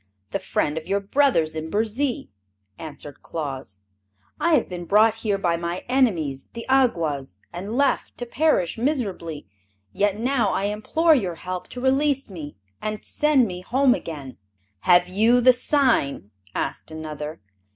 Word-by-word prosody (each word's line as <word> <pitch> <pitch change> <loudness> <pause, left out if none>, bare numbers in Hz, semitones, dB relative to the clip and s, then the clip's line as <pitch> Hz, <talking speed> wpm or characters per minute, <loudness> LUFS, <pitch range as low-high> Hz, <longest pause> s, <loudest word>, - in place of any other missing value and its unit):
"The - - -1
friend 150 +2 -1
of 155 - -15
your 200 +1 +1
brothers 200 - +2
in 160 0 -4
Burzee," 225 - -1 0.5
answered 145 -2 -9
Claus. 135 -11 -6 0.6
"I 340 -2 +4
have 255 - +1
been 175 -1 -6
brought 215 +4 +5
here 205 -3 +1
by 170 -3 0
my 170 +2 -4
enemies, 175 - +1
the 230 - -7
Awgwas, 165 - +1 0.2
and 200 +7 -4
left 280 0 +1
to 245 - -4
perish 240 - +1
miserably. 200 - -2 0.5
Yet 205 0 +1
now 235 -3 +1
I - - -1
implore 215 +11 +2
your 190 - 0
help 180 +2 -5
to 250 - -8
release 270 -1 +2
me 155 -5 -8 0.3
and 215 0 -4
to - - -4
send 295 -5 +3
me 180 -1 -6
home 255 +6 +3
again." 145 - -6 0.4
"Have 175 - +5
you 220 +6 +4
the 255 +1 +6
sign?" 245 - +1 0.2
asked - - -3
another. 155 -1 -6
200 Hz, 150 wpm, -24 LUFS, 160-255 Hz, 0.6 s, the